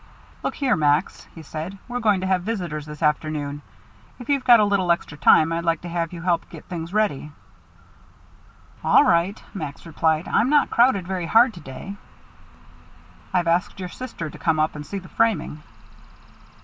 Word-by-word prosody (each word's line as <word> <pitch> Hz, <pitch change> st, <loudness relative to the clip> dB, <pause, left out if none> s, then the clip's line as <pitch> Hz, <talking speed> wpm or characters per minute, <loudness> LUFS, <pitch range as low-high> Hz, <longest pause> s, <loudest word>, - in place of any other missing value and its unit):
"Look -, -, -3 dB
here, 265 Hz, -6 st, +1 dB
Max," 150 Hz, +1 st, 0 dB
he 165 Hz, -, -10 dB
said, 160 Hz, +6 st, -6 dB
"we're 245 Hz, 0 st, -3 dB
going 210 Hz, -5 st, +2 dB
to -, -, -2 dB
have 190 Hz, -1 st, +1 dB
visitors 175 Hz, -8 st, -4 dB
this 150 Hz, +1 st, -8 dB
afternoon. 150 Hz, -1 st, -1 dB, 0.6 s
If 245 Hz, 0 st, -11 dB
you've 280 Hz, -2 st, +1 dB
got 240 Hz, -2 st, +7 dB
a 210 Hz, -, +4 dB
little 195 Hz, -4 st, +1 dB
extra 170 Hz, -3 st, -1 dB
time 155 Hz, +2 st, +5 dB
I'd 170 Hz, 0 st, -2 dB
like 165 Hz, -1 st, 0 dB
to 175 Hz, -, -7 dB
have 170 Hz, -1 st, -2 dB
you 170 Hz, -2 st, -8 dB
help 175 Hz, -2 st, 0 dB
get -, -, -11 dB
things 170 Hz, -2 st, -6 dB
ready." 195 Hz, -9 st, -1 dB, 1.5 s
"All -, -, +6 dB
right," 170 Hz, +5 st, +2 dB
Max 150 Hz, -8 st, -7 dB
replied. 160 Hz, 0 st, 0 dB
"I'm 235 Hz, -, +2 dB
not 295 Hz, -1 st, +3 dB
crowded 235 Hz, -6 st, +3 dB
very 180 Hz, -2 st, -3 dB
hard 230 Hz, +4 st, +5 dB
to 175 Hz, -, -11 dB
day." 150 Hz, +9 st, -9 dB, 1.3 s
"I've 180 Hz, -3 st, +1 dB
asked 170 Hz, +3 st, 0 dB
your 180 Hz, -1 st, -5 dB
sister 230 Hz, -7 st, -7 dB
to -, -, -11 dB
come 160 Hz, -2 st, +1 dB
up 155 Hz, 0 st, +1 dB
and 150 Hz, -, -6 dB
see 150 Hz, +7 st, -6 dB
the 185 Hz, -1 st, -9 dB
framing." 185 Hz, -10 st, 0 dB
175 Hz, 180 wpm, -23 LUFS, 155-205 Hz, 1.5 s, got